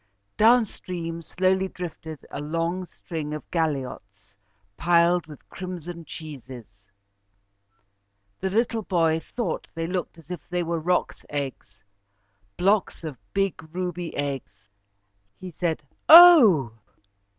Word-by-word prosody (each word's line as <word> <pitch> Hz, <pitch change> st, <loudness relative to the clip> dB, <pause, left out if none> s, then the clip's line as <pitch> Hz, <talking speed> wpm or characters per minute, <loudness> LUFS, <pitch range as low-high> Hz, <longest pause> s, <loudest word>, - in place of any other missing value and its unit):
Down 235 Hz, +2 st, +5 dB
stream 170 Hz, -4 st, -6 dB
slowly 185 Hz, +3 st, 0 dB
drifted 160 Hz, -4 st, -8 dB
a 140 Hz, -, -5 dB
long 165 Hz, +4 st, -2 dB
string 155 Hz, -4 st, -6 dB
of 150 Hz, -, -7 dB
galliots 125 Hz, -, -3 dB, 0.4 s
piled 170 Hz, -, +3 dB
with 150 Hz, -3 st, -13 dB
crimson 175 Hz, -2 st, -7 dB
cheeses. 130 Hz, -8 st, -9 dB, 1.7 s
The 190 Hz, -, -1 dB
little 225 Hz, +2 st, 0 dB
boy 165 Hz, -5 st, +1 dB
thought 235 Hz, +7 st, -4 dB
they 165 Hz, 0 st, -2 dB
looked 180 Hz, -1 st, -4 dB
as 165 Hz, +1 st, -14 dB
if 175 Hz, -4 st, -5 dB
they 180 Hz, -1 st, -1 dB
were 170 Hz, 0 st, -2 dB
roc's 180 Hz, +3 st, -1 dB
eggs, 135 Hz, -8 st, -6 dB, 0.7 s
blocks 195 Hz, 0 st, +1 dB
of 155 Hz, -4 st, -5 dB, 0.2 s
big 195 Hz, -3 st, -1 dB
ruby 180 Hz, -2 st, -4 dB
eggs. 140 Hz, -8 st, -5 dB, 0.7 s
He 185 Hz, -1 st, -8 dB
said, 165 Hz, -1 st, -2 dB, 0.3 s
"Oh!" 280 Hz, -, +9 dB
170 Hz, 115 wpm, -25 LUFS, 150-185 Hz, 1.7 s, Oh